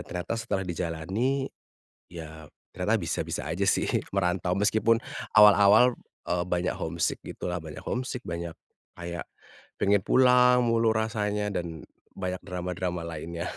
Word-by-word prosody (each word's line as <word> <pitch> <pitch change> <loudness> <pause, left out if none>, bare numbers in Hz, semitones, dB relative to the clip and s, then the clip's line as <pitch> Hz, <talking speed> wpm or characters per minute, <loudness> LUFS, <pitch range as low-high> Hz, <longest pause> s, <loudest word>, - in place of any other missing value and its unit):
ternyata 90 +4 -5
setelah 95 -4 -2
dijalani 90 - -2 0.7
ya 80 -2 -9 0.3
ternyata - - +1
bisa-bisa 70 - -3
aja 85 +5 -1
sih 95 - +2 0.2
merantau 90 -2 0
meskipun 110 +4 +2 0.3
awal-awal, 105 +3 +7 0.3
eee, 90 0 0
banyak 90 0 -1
homesick 85 +1 -2
gitulah, 90 -2 -5
banyak 80 -2 -8
homesick 125 0 -2
banyak 85 0 -4 0.5
kayak 85 0 -5 0.6
pengen 100 -1 +3
pulang 125 -1 +5
mulu 115 -1 +3
rasanya 105 -2 -1
dan 85 -2 -5 0.3
banyak 90 -1 -4
drama-drama 90 -1 -3
lainnya. 85 +2 -5
90 Hz, 120 wpm, -27 LUFS, 85-110 Hz, 0.7 s, awal-awal